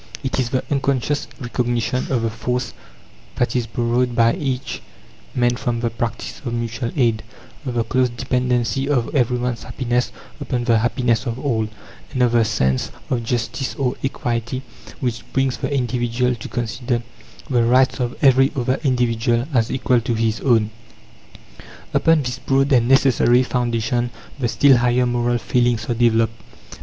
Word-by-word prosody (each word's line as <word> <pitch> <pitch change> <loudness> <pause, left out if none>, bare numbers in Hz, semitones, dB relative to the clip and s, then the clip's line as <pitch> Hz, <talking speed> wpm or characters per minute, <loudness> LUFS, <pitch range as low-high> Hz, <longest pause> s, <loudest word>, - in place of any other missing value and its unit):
It 135 0 -1
is 125 -2 0
the 130 +1 0
unconscious 140 0 0
recognition 120 0 -1
of 120 -3 +1
the 115 - 0
force 125 +3 -2 0.6
that 120 - 0
is 120 -2 0
borrowed 120 +2 0
by 115 0 +4
each 135 -3 -3 0.5
man 120 -1 +2
from 120 -2 -1
the 115 -1 0
practice 115 0 -4
of 120 -3 -3
mutual 115 +1 -3
aid; 115 -5 +2 0.5
of 125 - -3
the 115 - +2
close 130 +1 +1
dependency 125 +2 0
of 125 -5 0
every 125 -3 +2
one's 120 -2 -2
happiness 125 -1 -1 0.3
upon 125 -3 -2
the 115 -2 +3
happiness 120 0 +1
of 115 0 -2
all; 115 -5 0 0.4
and 125 - +1
of 120 - +3
the 120 -1 +4
sense 65 - 0 0.2
of 120 -3 0
justice, 120 +3 -2
or 130 -2 0
equity, 120 -1 -2 0.4
which 120 -3 -1
brings 135 -1 +1
the - - -3
individual 125 -1 0
to 115 -1 -7
consider 120 0 -2 0.4
the 125 -5 +2
rights 130 +3 +3
of 125 -1 -2
every 135 0 +5
other 130 0 0
individual 120 -2 +1
as 115 -3 +2
equal 125 -2 +2
to 115 +1 -1
his 110 0 0
own. 115 -5 +2 1.2
Upon 165 -2 +4
this 125 0 -4
broad 135 +2 +1
and 120 -2 +4
necessary 130 -2 +4
foundation 120 -1 0 0.3
the 125 - +1
still 130 +4 +5
higher 125 +1 +2
moral 120 0 +1
feelings 120 -1 +1
are - - +3
developed. 115 -1 +2
120 Hz, 160 wpm, -21 LUFS, 115-130 Hz, 1.2 s, every